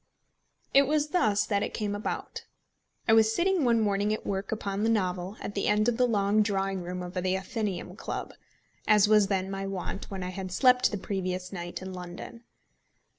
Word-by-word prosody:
It 275 0 +6
was 300 0 +1
thus 215 - +2
that 200 -2 0
it - - -3
came 210 -2 -2
about. 205 +3 -4 0.6
I 225 - +5
was 220 0 +5
sitting 370 -2 +2
one 235 -2 +3
morning 205 -1 +1
at 215 - -3
work 195 0 -3
upon 200 -2 -2
the 225 - +2
novel 185 -2 -1
at 205 - -5
the 200 - -1
end 210 +1 +3
of 240 -1 +1
the 250 - +4
long 205 -1 +2
drawing 195 -2 0
room 180 +1 -5
of 180 0 -7
the 180 - -2
Athenæum 190 -2 -3
Club, - - -5 0.5
as 210 -1 +6
was 210 -2 +5
then 190 -1 -1
my 195 0 -3
wont 195 0 -5
when 190 -2 -5
I 180 - -3
had 185 0 -6
slept 250 +5 +4
the 205 - -3
previous 185 -1 -3
night 175 0 -6
in 190 0 -6
London. 180 +6 -8
200 Hz, 195 wpm, -28 LUFS, 190-220 Hz, 0.6 s, It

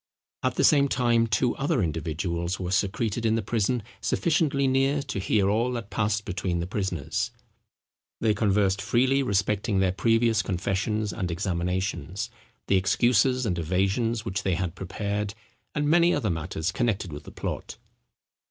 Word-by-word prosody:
At 130 -1 0
the - - +1
same 140 -2 +5
time 120 -3 +2
two 120 +2 +1
other 140 - +1
individuals 85 +3 -2
were 90 -1 -3
secreted 100 +3 0
in 110 -1 +2
the 115 - -1
prison 115 +2 0 0.2
sufficiently 150 -4 +1
near 135 +2 +2
to 130 -7 -4
hear 100 +1 +2
all 115 +5 +1
that 115 -3 -5
passed 105 -1 0
between 90 -2 -2
the 85 - -2
prisoners. 90 -6 -2 0.9
They 110 -2 +2
conversed 100 -2 +2
freely 125 +5 +2
respecting 100 -3 0
their 95 -1 +3
previous 115 +3 +2
confessions 100 +3 -1
and 90 - -3
examinations—the 95 +4 -3
excuses 120 +6 +3
and 90 -5 -1
evasions 100 +7 0
which 100 -1 -2
they 95 -2 0
had 90 -1 -2
prepared, 100 +3 -3 0.4
and 150 0 0
many 170 +2 +4
other - - 0
matters 80 +1 -2
connected 100 -5 -1
with 75 0 -8
the - - -10
plot. - - -5
105 Hz, 150 wpm, -26 LUFS, 95-120 Hz, 0.9 s, same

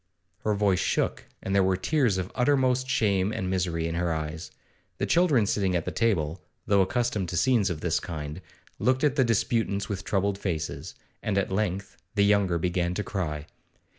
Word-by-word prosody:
Her 105 -1 0
voice 100 -3 +2
shook, - - -1 0.2
and 95 - -2
there 100 - +5
were 95 0 +2
tears 125 - +1
of 90 0 -3
uttermost 130 -1 +2
shame 100 -5 +2
and 95 - -3
misery 85 -3 0
in 85 - -3
her 85 0 0
eyes. 80 +1 -4 0.5
The - - 0
children 160 -11 +3
sitting 95 -2 0
at 85 - 0
the - - -2
table, 90 -7 0 0.2
though 100 -1 +4
accustomed 105 -2 0
to 90 - -2
scenes 120 -5 +3
of 80 -3 -4
this 85 -3 +1
kind, 75 0 -6 0.4
looked 130 +2 +2
at 145 -2 +3
the 135 - +4
disputants 115 -3 0
with 100 -1 -3
troubled 100 0 0
faces, 80 -6 -4 0.3
and 105 -2 -1
at 100 - 0
length 100 -1 -2 0.2
the 100 -1 +4
younger 100 -4 +3
began 90 +1 0
to 105 - -1
cry. 75 -8 -3
95 Hz, 185 wpm, -27 LUFS, 90-110 Hz, 0.5 s, there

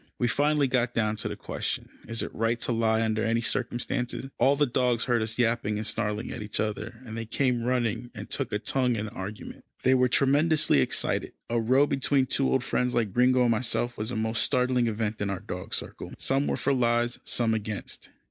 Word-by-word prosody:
We 120 - +1
finally 145 +4 +2
got 125 -1 0
down 110 -1 +1
to 110 - -2
the - - -4
question, - - -4 0.2
is 115 0 -1
it - - -6
right 115 +1 0
to - - 0
lie 115 -1 +2
under 110 -1 0
any 115 0 +1
circumstances? 125 +3 -2
All 140 +2 +5
the 145 +1 +3
dogs 125 -2 +1
heard 120 -2 +1
us 110 0 -3
yapping 115 -3 +1
and 110 - -3
snarling 105 +1 -1
at 120 - -6
each 105 0 -3
other, 110 +3 -3
and 110 -2 -7
they 115 -1 -5
came 125 0 +1
running, 120 -1 -1
and 105 0 -7
took - - -2
a - - +1
tongue 125 +3 +1
in 105 -1 -2
the 105 - -7
argument. 100 +3 -7 0.2
They 130 - +5
were 125 -1 +4
tremendously 145 - +3
excited. - - -1 0.2
A 120 - +2
row 130 +5 +4
between 135 -1 +1
two 135 +1 +1
old 130 - +2
friends 125 -1 0
like 110 -5 0
Gringo 125 +2 +4
and 120 - +3
myself 120 +1 0
was 105 +1 -3
a 125 - -3
most 110 +1 0
startling 125 -2 +2
event 110 -1 -2
in 100 - 0
our 95 -2 -2
dog 90 -3 -5
circle. - - -5
Some 135 +1 +1
were - - 0
for 140 - +1
lies, 120 -1 +1
some 115 -2 +1
against. 105 -2 -5
120 Hz, 215 wpm, -27 LUFS, 110-125 Hz, 0.2 s, All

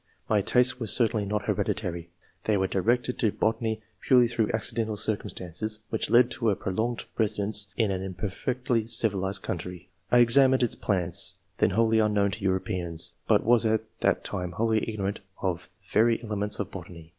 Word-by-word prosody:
My 105 -2 +3
tastes 125 +4 +3
were 115 - -3
certainly 110 -1 +2
not 105 +1 -1
hereditary. 90 -5 -2 0.4
They 105 -2 +2
were 95 - +1
directed 120 +7 0
to 110 - +2
botany 110 0 -1 0.2
purely 125 -2 +6
through 115 -2 0
accidental 110 -1 -2
circumstances 105 -1 -3
[which 110 - -1
led 120 +1 +5
to 115 -3 0
a 100 - +2
prolonged 110 +6 -2
residence 105 -1 0
in 110 -4 +2
an 95 -1 -2
imper 95 +1 -4
fectly 125 0 -1
civilized 100 -4 +1
country]. 90 0 -5 0.2
I 125 - +6
examined 130 +2 +5
its 120 - +1
plants, 90 -4 -1 0.2
then - - +4
wholly 110 +3 +3
unknown 105 -2 +2
to 100 +1 -6
Europeans, 90 -3 -1
but - - +4
was 120 0 +4
at 110 -1 +1 0.2
that - - +1
time 90 -2 -4
wholly 110 +3 0
ignorant 100 -2 -3 0.2
of 90 -3 -2 0.2
the - - -25
very 115 +2 +3
elements 105 -1 -2
of 105 - -3
botany. 85 -3 -10
105 Hz, 170 wpm, -27 LUFS, 95-115 Hz, 0.4 s, purely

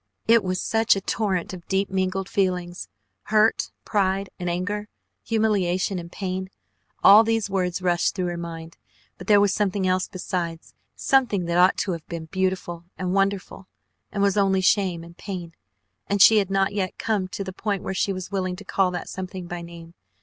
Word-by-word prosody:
It 230 -1 +5
was 185 0 -1
such 225 -1 +3
a 195 - -3
torrent 190 -3 -1
of 175 -2 -10
deep 195 +1 +1
mingled 190 0 -1
feelings, 180 -3 -1 0.4
hurt 215 +1 +3 0.2
pride 195 -1 0
and 175 -1 -2
anger, 200 +4 -2 0.4
humiliation, 195 -4 +1
and 170 0 -9
pain 185 -1 -4 0.5
all 210 +3 +9
these 225 -2 0
words 180 -1 -1
rushed 175 -1 +1
through 185 -2 -1
her 175 0 -2
mind, 165 -1 -7 0.4
but 180 - -10
there 205 -1 +6
was 200 -1 +3
something 200 -2 0
else 185 0 +1
besides, 175 -3 -4 0.2
something 245 -9 +2
that 170 +1 +1
ought 185 +2 +5
to 195 - -1
have 165 -3 -6
been 170 -2 -6
beautiful 185 -1 -2
and 180 0 -2
wonderful, 195 -1 -1 0.4
and 200 -1 -1
was 200 0 +2
only 195 -1 +3
shame 185 -3 +2
and 170 +1 -14
pain, 180 -4 -6 0.5
and 200 - 0
she 215 +2 +8
had 195 -2 -1
not 195 0 +1
yet 190 -3 -2
come 210 -4 -1
to 195 - -5
the 190 -1 -7
point 200 -1 -2
where - - -3
she 195 - 0
was 185 0 -5
willing 185 -2 -1
to 205 +2 -11
call 190 -1 +2
that 180 -1 -5
something 185 -1 -6
by 175 0 -6
name. 170 -1 -11
190 Hz, 185 wpm, -24 LUFS, 180-200 Hz, 0.5 s, all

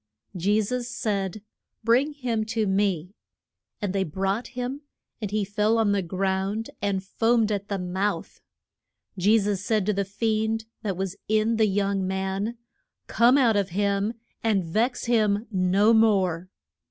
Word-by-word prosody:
Je 200 +4 +2
sus 240 +3 -2
said, 200 -4 -2 0.4
Bring 250 +7 +3
him 240 -6 -1
to 220 0 -1
me. 190 -3 0 0.7
And 205 -3 -2
they 195 -1 +1
brought 195 +7 -2
him; 255 +3 -3 0.4
and 210 - -2
he 210 0 0
fell 210 +3 +1
on 220 -2 +3
the 200 -1 +2
ground 190 +4 -2
and 195 -2 -1
foamed 225 +2 +1
at 200 -1 -2
the 200 - -2
mouth. 190 +3 -3 0.7
Je 200 +4 +4
sus 200 -2 -1
said 215 -2 +1
to 210 - +1
the 200 0 0
fiend 220 +2 -1 0.2
that 195 -4 -3
was 190 0 -3
in 220 +1 +2
the 220 -1 +4
young 195 -1 0
man, 190 +4 -2 0.5
Come 240 +4 +4
out 240 -6 +4
of 200 -2 +1
him 200 +1 +1 0.3
and 210 -4 +2
vex 225 +10 0
him 215 -3 +2
no 195 +3 +3
more. 190 -6 +2
205 Hz, 155 wpm, -25 LUFS, 195-225 Hz, 0.7 s, Je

